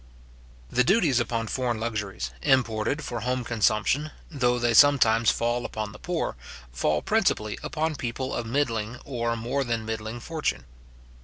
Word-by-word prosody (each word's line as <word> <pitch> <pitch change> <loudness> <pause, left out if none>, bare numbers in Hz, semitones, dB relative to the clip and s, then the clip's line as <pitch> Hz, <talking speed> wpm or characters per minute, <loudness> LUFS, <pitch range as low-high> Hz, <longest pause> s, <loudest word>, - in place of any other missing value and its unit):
The 125 - +3
duties 150 - +3
upon 115 -1 -1
foreign 120 -1 -1
luxuries, 105 - -3
imported 120 - +1
for 120 -4 -4
home 125 +2 -1
consumption, 115 +6 +1 0.2
though 125 -5 +1
they 120 -1 +1
sometimes 115 -4 +6
fall 120 +1 0
upon 110 -3 -4
the 105 - -12
poor, 175 -2 -2 0.4
fall 75 +4 0
principally 105 0 +1
upon 160 0 -2
people 130 +1 -3
of 120 -1 -3
middling 115 -3 -1
or 120 -3 -1
more 125 +5 -1
than 115 -3 -2
middling 110 +1 -4
fortune. 155 - -3
120 Hz, 145 wpm, -26 LUFS, 110-130 Hz, 0.4 s, sometimes